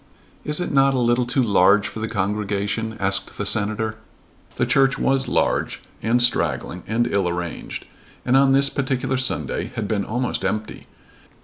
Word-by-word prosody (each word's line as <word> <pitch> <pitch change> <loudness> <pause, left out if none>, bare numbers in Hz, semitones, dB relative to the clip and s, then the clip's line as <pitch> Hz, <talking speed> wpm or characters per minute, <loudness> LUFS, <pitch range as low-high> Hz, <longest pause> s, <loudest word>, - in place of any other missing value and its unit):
"Is 150 +2 +1
it 175 - -2
not 135 -1 +4
a - - +1
little 120 0 +2
too 125 +1 +2
large 100 -1 +4
for - - -7
the 110 - -2
congregation?" 105 +1 -2
asked 100 0 0
the - - -2
Senator. 110 +1 0 0.6
The - - +1
church 135 0 +3
was 135 0 +1
large - - 0 0.2
and 115 +2 +2
straggling 85 - 0
and 115 +2 +1
ill 100 -5 0
arranged, 85 -1 -5 0.4
and 125 - +2
on 135 0 +5
this 140 +1 +4
particular 130 -1 -1
Sunday 130 0 -3
had 110 -3 -3
been 100 -2 -1
almost 125 +4 -2
empty. 110 0 -3
110 Hz, 165 wpm, -22 LUFS, 100-130 Hz, 0.6 s, on